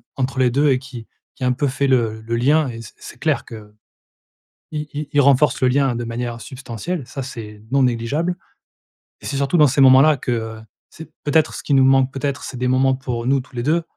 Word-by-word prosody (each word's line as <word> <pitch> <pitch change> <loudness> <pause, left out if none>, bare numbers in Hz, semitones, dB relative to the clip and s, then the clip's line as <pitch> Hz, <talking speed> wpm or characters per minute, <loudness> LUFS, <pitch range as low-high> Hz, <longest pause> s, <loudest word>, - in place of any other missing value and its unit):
entre 130 0 -2
les 125 -1 +4
2 145 +4 +2
et 130 - +2
qui 130 -4 -10 0.3
qui 130 - -8
un 125 - +2
peu 140 +3 0
fait 140 +1 -1
le 115 -4 +1
le 115 +1 -3
lien 145 +5 +3
et 115 -1 -7
c 105 - -12
c'est - - -12
clair - - 0
que 105 -2 -11 1.0
i 150 0 -4
i 150 0 -4
il 145 - +4
renforce 140 0 +3
le 130 - +5
lien 135 -1 +2
de 120 - -3
manière 115 0 -4
substantielle 130 +4 -6
ça 135 - -6
c'est 105 -4 -9
non 135 +1 +3
négligeable 135 +9 -1 0.9
et - - -12
c'est 140 - -3
surtout 140 +5 +1
dans 150 -2 +6
ces 135 +2 +1
moments-là 135 +3 +6
que, 125 - -4
heu, 110 -1 -4 0.3
c'est 160 - -12
peut-être 155 +2 +2
ce - - -6
qui 145 - -1
nous 135 - +5
manque 135 0 +4
peut-être 140 0 -3
c'est 130 - -7
des 125 +1 -1
moments 130 +1 +2
pour 125 -3 -4
nous 135 +1 +3
tous 130 0 -18
les 120 - -3
2 165 +5 +1
130 Hz, 230 wpm, -20 LUFS, 120-140 Hz, 1.0 s, dans